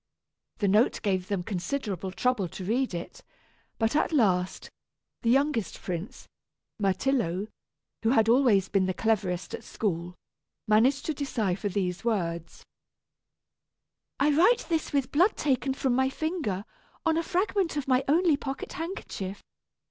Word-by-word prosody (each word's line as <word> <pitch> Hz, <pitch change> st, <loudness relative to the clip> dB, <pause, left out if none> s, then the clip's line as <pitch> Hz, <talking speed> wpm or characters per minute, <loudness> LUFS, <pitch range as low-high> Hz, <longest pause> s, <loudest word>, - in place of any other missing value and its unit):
The 205 Hz, -, +1 dB
note 210 Hz, +5 st, +3 dB
gave 190 Hz, -3 st, 0 dB
them 195 Hz, -3 st, -1 dB
considerable 195 Hz, -, -3 dB
trouble 230 Hz, -1 st, 0 dB
to 180 Hz, +2 st, -8 dB
read 240 Hz, 0 st, 0 dB
it, 475 Hz, -, -7 dB, 0.5 s
but, 225 Hz, +3 st, +1 dB
at 305 Hz, -, +2 dB
last, 190 Hz, -, +1 dB, 0.5 s
the 230 Hz, -, +1 dB
youngest 270 Hz, -3 st, +1 dB
prince, 180 Hz, +2 st, -6 dB, 0.5 s
Myrtillo, 200 Hz, -1 st, 0 dB, 0.5 s
who 225 Hz, -, +2 dB
had 225 Hz, -3 st, +4 dB
always 230 Hz, -6 st, +4 dB
been 190 Hz, -2 st, +1 dB
the 185 Hz, -, -1 dB
cleverest 190 Hz, -5 st, 0 dB
at -, -, -5 dB
school, 180 Hz, -4 st, -3 dB, 0.5 s
managed 240 Hz, +6 st, +3 dB
to 315 Hz, -, 0 dB
decipher 220 Hz, -9 st, -1 dB
these 180 Hz, -2 st, -2 dB
words: 170 Hz, -7 st, -2 dB, 1.5 s
"I 290 Hz, +2 st, +4 dB
write 460 Hz, +10 st, +4 dB
this 325 Hz, -2 st, 0 dB
with 275 Hz, -2 st, 0 dB
blood 360 Hz, +8 st, +3 dB
taken 265 Hz, -2 st, 0 dB
from 265 Hz, -2 st, 0 dB
my 265 Hz, +1 st, +2 dB
finger, 270 Hz, -, -2 dB, 0.4 s
on 325 Hz, -1 st, +3 dB
a 330 Hz, -, +2 dB
fragment 370 Hz, -1 st, 0 dB
of 285 Hz, -, -2 dB
my 260 Hz, 0 st, +3 dB
only 320 Hz, +1 st, +4 dB
pocket 270 Hz, -1 st, -5 dB
handkerchief. 325 Hz, -, -5 dB
230 Hz, 140 wpm, -28 LUFS, 190-280 Hz, 1.5 s, had